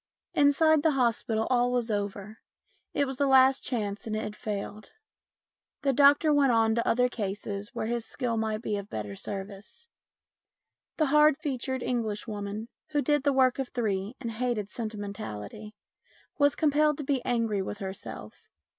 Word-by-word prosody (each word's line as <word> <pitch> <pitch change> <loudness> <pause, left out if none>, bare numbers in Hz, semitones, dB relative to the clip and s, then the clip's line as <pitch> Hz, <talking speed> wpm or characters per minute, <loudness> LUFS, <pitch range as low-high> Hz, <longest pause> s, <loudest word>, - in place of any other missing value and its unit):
Inside 295 +2 +4
the 315 0 +3
hospital 225 -2 +1
all 245 0 +3
was 240 -2 0
over. 205 +1 -4 0.5
It 285 - +1
was 265 -1 -5
the 280 - +2
last 265 0 +5
chance 210 -4 -3
and 215 - -2
it 215 - -2
had 210 - -5
failed. 210 0 -6 0.9
The 275 -1 +2
doctor 290 +3 +5
went 280 -3 +4
on 225 -1 +3
to 235 +1 0
other 250 +1 +3
cases 205 -2 -5
where - - -2
his 235 0 -2
skill 240 -1 -3
might 220 0 -2
be 210 -3 -1
of 200 0 -7
better 105 -2 -5
service. 200 - -7 1.1
The 310 - +3
hard 300 -1 +6
featured 260 -3 -3
Englishwoman, 215 -2 -3 0.3
who 290 -1 +2
did 295 +2 +2
the 285 +1 +2
work 260 -1 +3
of 265 - -2
three 210 -2 -2
and 235 -3 -4
hated 225 -3 -2
sentimentality, 205 - -6 0.6
was 285 0 +4
compelled 300 -1 +2
to 295 - -4
be 265 -2 0
angry 230 -4 0
with 200 +2 -5
herself. 190 -1 -8
230 Hz, 160 wpm, -28 LUFS, 210-270 Hz, 1.1 s, hard